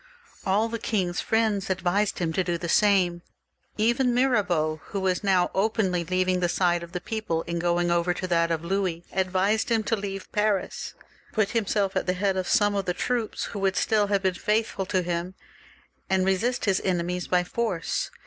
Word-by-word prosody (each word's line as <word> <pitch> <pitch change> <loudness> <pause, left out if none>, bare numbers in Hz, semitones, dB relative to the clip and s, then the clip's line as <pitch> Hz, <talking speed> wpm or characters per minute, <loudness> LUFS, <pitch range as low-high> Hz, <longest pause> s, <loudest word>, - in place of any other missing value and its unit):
All 205 +4 +2
the 230 0 -4
king's 185 -6 -1
friends 220 -4 0
advised 190 +2 0
him 165 -2 -1
to 190 - +1
do 175 -1 -1
the 170 - -5
same. 180 -2 +3 0.6
Even 240 +3 +2
Mirabeau, 190 -12 +1
who 200 - -4
was 190 -1 0
now 185 -3 +2
openly 195 -4 +1
leaving 185 +1 +1
the 175 -1 +1
side 175 -1 +1
of 170 +1 -10
the 180 - -2
people 205 -4 -3
and 170 0 -2
going 175 0 +1
over 170 +1 +2
to 180 - -3
that 170 -2 +2
of 165 0 -2
Louis, 180 -2 -1
advised 190 +4 +1
him 225 -2 +2
to 225 - +1
leave 195 -2 -6
Paris, 210 -2 -1 0.4
put 215 -2 +1
himself 205 -3 0
at - - -1
the 180 - +2
head 195 +1 0
of 185 -1 -2
some 205 -1 +3
of 200 -1 -1
the 180 - -1
troops, 240 -3 -2
who 205 - -4
would 195 -1 +1
still 210 -2 +2
have 200 -1 0
been 190 -1 +2
faithful 210 0 -1
to 185 -1 +1
him, 175 +1 -3 0.7
and 190 -1 +2
resist 225 +7 0
his 195 -3 +2
enemies 180 -1 -1
by 180 -1 +2
force. 190 -3 -2
190 Hz, 190 wpm, -26 LUFS, 175-210 Hz, 0.7 s, same